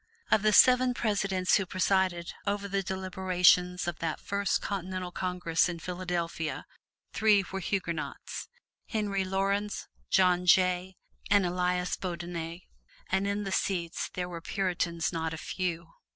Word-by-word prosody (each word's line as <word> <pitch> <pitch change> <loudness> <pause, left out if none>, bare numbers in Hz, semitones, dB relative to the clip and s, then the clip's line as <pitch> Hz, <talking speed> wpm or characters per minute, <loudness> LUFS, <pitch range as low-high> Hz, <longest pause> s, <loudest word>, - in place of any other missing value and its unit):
Of 215 - +5
the 215 +1 +3
seven 250 +2 +6
Presidents 195 -5 +1
who 195 - -1
presided 185 -1 +1
over 200 0 -1
the 195 0 0
deliberations 185 -1 +2
of 175 -2 -3
that 165 -2 -2
first 200 0 0
Continental 185 -2 -4
Congress 180 -2 0
in 175 - -4
Philadelphia, 175 -2 -3 0.5
three 210 -3 +4
were 195 - -3
Huguenots: 170 -4 -4 0.4
Henry 205 -4 -1
Laurens, 195 +2 -1 0.2
John 180 -1 +3
Jay 185 0 +3 0.3
and 200 -2 +4
Elias 180 0 0
Boudinot, 170 -1 -5 0.5
and 190 +1 +1
in 200 +1 -1
the 195 - -4
seats 175 -4 -1
there 180 -1 -2
were 170 -2 -7
Puritans 175 -3 -1
not 160 -1 -2
a - - -8
few. 170 -1 -3
185 Hz, 135 wpm, -29 LUFS, 175-195 Hz, 0.5 s, seven